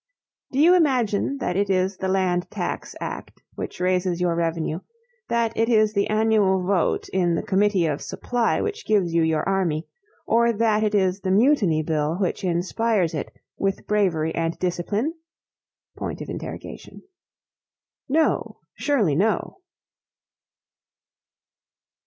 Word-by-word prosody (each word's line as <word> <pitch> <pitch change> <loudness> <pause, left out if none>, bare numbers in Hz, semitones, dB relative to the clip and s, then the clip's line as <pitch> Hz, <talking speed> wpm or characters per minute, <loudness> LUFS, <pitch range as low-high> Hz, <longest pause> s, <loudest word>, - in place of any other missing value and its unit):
Do 260 - -4
you 325 +5 +6
imagine 265 - +2
that 180 -9 -2
it 200 +1 +1
is 190 0 +1
the 190 - -3
Land 185 -2 0
Tax - - -4
Act - - -7
which - - -6
raises 180 -1 0
your 175 -1 +1
revenue, 165 -1 -1 0.5
that 230 -1 0
it 225 +1 +1
is 215 -2 +3
the 200 -1 +1
annual 215 -4 +2
vote 190 -2 +1
in 175 -3 +1
the - - -2
Committee 195 -2 +2
of 150 -2 -1
Supply 240 -2 -1
which 430 +1 -4
gives 190 -6 +2
you 170 - +3
your 160 -1 +1
army, 175 -5 0 0.4
or 235 +1 +3
that 215 -1 +2
it 210 -1 +1
is 190 -1 +1
the 190 - -2
Mutiny 195 - +3
Bill 155 0 0
which 185 +1 -2
inspires 185 +1 0
it 150 - -4 0.3
with 195 -1 -1
bravery 175 -7 +1
and 165 0 -2
discipline? 195 - -1 3.0
No! 315 +3 +1 0.2
surely 235 - +1
no! 205 - 0
195 Hz, 130 wpm, -23 LUFS, 175-220 Hz, 3.0 s, you